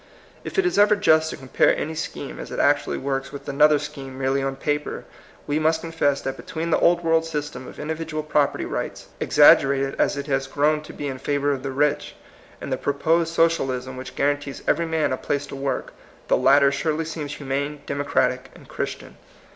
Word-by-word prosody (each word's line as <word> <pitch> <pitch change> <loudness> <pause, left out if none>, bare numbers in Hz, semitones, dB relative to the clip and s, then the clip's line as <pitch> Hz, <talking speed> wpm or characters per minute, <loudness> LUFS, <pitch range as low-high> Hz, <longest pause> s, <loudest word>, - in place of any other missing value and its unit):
If - - -7
it 390 - +3
is 360 - +1
ever 210 +1 +6
just 160 -6 +3
to - - -6
compare 130 -1 +2
any 160 - -3
scheme 155 -3 -6
as - - -7
it - - -6
actually 145 0 +2
works 135 0 -3
with 140 - -9
another 150 +2 +4
scheme 135 -2 -7
merely 135 +1 0
on 135 0 -2
paper, 150 +2 -3 0.4
we 145 +1 0
must 160 +1 +2
confess 160 -4 0
that 135 0 -4
between 165 +1 -4
the - - +3
Old 175 0 +3
World 165 0 +3
system 150 -5 -5
of - - -11
individual 155 0 -4
property 150 -2 +1
rights, - - -5
exaggerated 135 0 +5
as - - +2
it 140 - -4
has 135 -2 -1
grown 150 +1 +1
to - - -6
be 145 - -6
in 135 -2 -4
favor 145 +1 0
of 135 -2 -2
the 135 - -4
rich, 145 +2 0 0.4
and - - -4
the - - 0
proposed 160 +4 +1
Socialism 135 -6 +1
which 130 +1 -8
guarantees 145 0 -1
every 165 +2 +2
man 160 -4 0
a - - -1
place 145 0 -2
to - - -8
work, 135 0 -3 0.4
the - - +5
latter 140 +1 +5
surely 155 +3 -1
seems 155 -2 -5
humane, 140 +1 -3
democratic, 140 0 0
and - - -15
Christian. - - -5
145 Hz, 195 wpm, -23 LUFS, 135-160 Hz, 0.4 s, ever